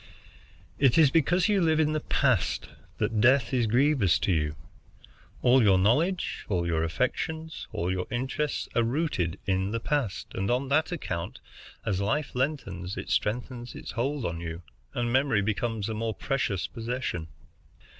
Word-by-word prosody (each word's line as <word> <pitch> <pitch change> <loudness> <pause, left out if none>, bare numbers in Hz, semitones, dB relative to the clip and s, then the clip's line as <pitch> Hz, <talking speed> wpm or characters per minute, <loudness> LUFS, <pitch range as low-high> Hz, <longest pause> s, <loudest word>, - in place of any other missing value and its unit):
It 135 -1 +4
is 155 -4 +6
because 165 +4 +3
you 205 -3 +3
live 160 -2 +3
in 155 -1 +3
the 155 - +1
past - - +1 0.3
that 110 -2 0
death 130 +1 +4
is 120 -3 +2
grievous 125 - +3
to - - 0
you. 75 -2 0 0.9
All 125 +1 +6
your 100 -4 +5
knowledge, 150 - +1
all 90 -4 0
your 80 -2 0
affections, 160 - -2
all 85 +2 -1
your 90 -1 -2
interests, 135 +4 -2
are 120 - +4
rooted 115 - 0
in 95 0 0
the 115 +2 -1
past, 135 -6 -2
and 95 +1 -2
on 130 +2 0
that 155 +4 +2
account, 90 - -4 0.5
as 100 -4 0
life 135 +9 -1
lengthens, 100 - -2
it - - -5
strengthens 120 +1 -2
its - - -7
hold 130 +3 -1
on 85 -1 -2
you, 85 0 -6 0.3
and 120 -1 0
memory 130 -6 +3
becomes 110 0 -1
a 110 - -2
more 110 0 -2
precious 105 -10 -1
possession. 115 -8 -4
120 Hz, 160 wpm, -28 LUFS, 95-140 Hz, 0.9 s, is